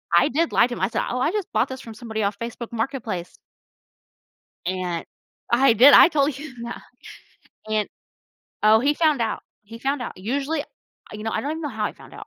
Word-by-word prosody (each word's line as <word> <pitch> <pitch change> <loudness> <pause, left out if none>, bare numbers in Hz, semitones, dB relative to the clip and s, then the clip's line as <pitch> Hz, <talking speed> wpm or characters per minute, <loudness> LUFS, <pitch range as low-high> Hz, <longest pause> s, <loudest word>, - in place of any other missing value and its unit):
I 170 - +5
did 325 +5 0
lie - - +4
to 240 - -5
him. - - -8
I 190 - +2
said, - - -1
"Oh, 250 - -2
I 305 +6 +1
just 415 -3 -3
bought 220 +5 +1
this 260 0 -7
from 225 -2 -10
somebody 220 -2 -4
off 200 0 -1
Facebook 235 +1 -6
Marketplace." 225 -7 -4 1.3
And 180 -2 -2 0.5
I 240 0 +5
did, 255 +6 +8
I - - +10
told 280 -3 +1
you 295 -2 -9
that. 235 - -6 0.9
And 215 -1 0 0.8
oh, 215 +1 +6
he 290 +3 +2
found 305 -6 +2
out, 225 - -2 0.2
he 225 +3 -11
found 270 +1 -1
out. - - -5
Usually 280 +9 -2
uh, - - -15 0.5
you 210 0 -7
know, 225 - -2
I 220 - 0
don't 290 +5 -3
even 320 0 -5
know 295 - -2
how 220 -4 -2
he - - -5
found - - -16
out - - -10
235 Hz, 215 wpm, -23 LUFS, 215-280 Hz, 1.3 s, I